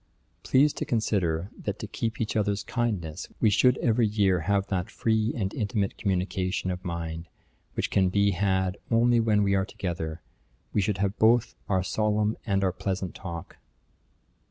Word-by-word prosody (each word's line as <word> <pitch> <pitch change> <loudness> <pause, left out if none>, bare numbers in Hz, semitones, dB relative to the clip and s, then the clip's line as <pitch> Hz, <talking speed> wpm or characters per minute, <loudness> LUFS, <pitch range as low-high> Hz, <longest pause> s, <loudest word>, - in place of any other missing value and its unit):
Please 140 +3 +4
to - - -3
consider, 95 -6 0
that 105 -1 -4
to - - -6
keep 115 +2 -3
each 110 - -2
other's 100 -1 0
kindness, 95 -9 -2
we 110 - +4
should 125 +5 +4
every 115 -1 +2
year 100 -3 +2
have 100 +4 +1
that 90 -2 -2
free 110 0 +1
and 100 -4 -2
intimate 105 -3 -1
communication 95 -1 -1
of 90 0 -5
mind 85 -2 -4 0.5
which - - -1
can 95 -2 +3
be 100 +2 +3
had 95 0 0
only 120 +1 +4
when 110 -2 +3
we 100 -1 +2
are 95 -1 +3
together. 85 -4 -4 0.5
We 105 - +3
should 100 0 0
have 100 +1 -1
both 115 +1 +4 0.2
our 95 -2 +2
solemn 105 +1 +1
and 100 -2 +1
our 95 -2 +1
pleasant 95 -2 -3
talk.' 85 -2 -7
100 Hz, 165 wpm, -27 LUFS, 95-110 Hz, 0.5 s, Please